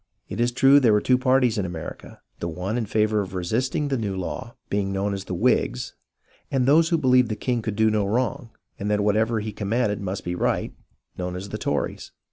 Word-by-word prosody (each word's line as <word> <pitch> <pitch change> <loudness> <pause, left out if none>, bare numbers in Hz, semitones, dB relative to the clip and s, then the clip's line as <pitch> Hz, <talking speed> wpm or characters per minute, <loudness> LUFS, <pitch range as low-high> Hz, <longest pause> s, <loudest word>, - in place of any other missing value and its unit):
It - - -5
is 120 +1 +2
true 135 +3 +6
there 120 -6 +4
were 105 - +4
two 125 +3 +2
parties 130 -3 +3
in 95 - -1
America, 85 -2 -8
— - - -44
the 85 - -3
one 90 +6 -3
in 120 -3 -1
favour 105 0 +2
of 95 -1 -6
resisting 120 - -1
the 135 -3 0
new 100 -3 -2
law 95 +5 -5
being 100 -1 -1
known 100 +1 -1
as 95 -1 -5
the 90 - -4
Whigs, 60 -7 +1 0.6
and 130 -2 +1
those 160 +4 +5
who 165 - +3
believed 125 -4 +4
the 110 - -1
king 120 +1 -1
could 110 -2 -3
do 110 0 +3
no 105 -2 +1
wrong, 120 +1 -1 0.3
and 100 - -2
that 105 0 +2
whatever 110 +2 +1
he 110 +1 -4
commanded 105 +1 -1
must 95 0 -4
be 90 - -2
right, 90 - -1 0.5
known 90 0 -3
as 95 +2 -6
the - - -5
Tories. - - -2
110 Hz, 225 wpm, -24 LUFS, 100-125 Hz, 0.6 s, true